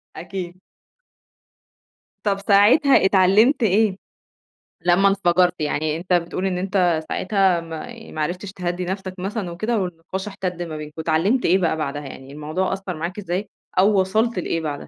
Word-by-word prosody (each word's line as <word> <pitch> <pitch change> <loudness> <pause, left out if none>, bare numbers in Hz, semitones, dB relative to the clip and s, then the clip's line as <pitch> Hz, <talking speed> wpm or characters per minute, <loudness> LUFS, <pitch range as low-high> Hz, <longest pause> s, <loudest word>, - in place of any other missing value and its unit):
أكيد. 180 +1 -7 1.6
طَب 200 -2 +1
ساعتها 210 +6 +5
اتعلمت 205 +8 +4
إيه؟ 210 -1 +3 0.9
لمّا 180 +3 +5
انفجرت، 180 -2 +2
يعني 155 +1 -1
أنت 180 +2 -4
بتقول 175 +2 0
إن 180 -1 -1
أنت 180 -4 +1
ساعتها 190 -3 +1
ما 165 +9 -9
ما 155 - -5
عرفتش 180 +5 -3
تهدّي 180 -1 -3
نفسك 190 0 -4
مثلًا 195 0 -3
وكده، 215 +7 -1
والنقاش 185 +2 -4
احتد 185 -3 -4
ما 160 -2 -5
بينكم. 150 0 -8
اتعلمت 165 +11 +1
إيه 185 +3 +4
بقى 165 -3 +1
بعدها، 145 -1 -3
يعني 135 0 -10
الموضوع 155 +6 -2
أثّر 190 -3 -4
معاك 175 +5 -5
إزاي؟ 190 +1 -3 0.3
أو 195 +1 +5
وصلت 220 +4 +1
لإيه 165 -1 -1
بعدها؟ 150 -3 -3
185 Hz, 150 wpm, -22 LUFS, 170-195 Hz, 1.6 s, ساعتها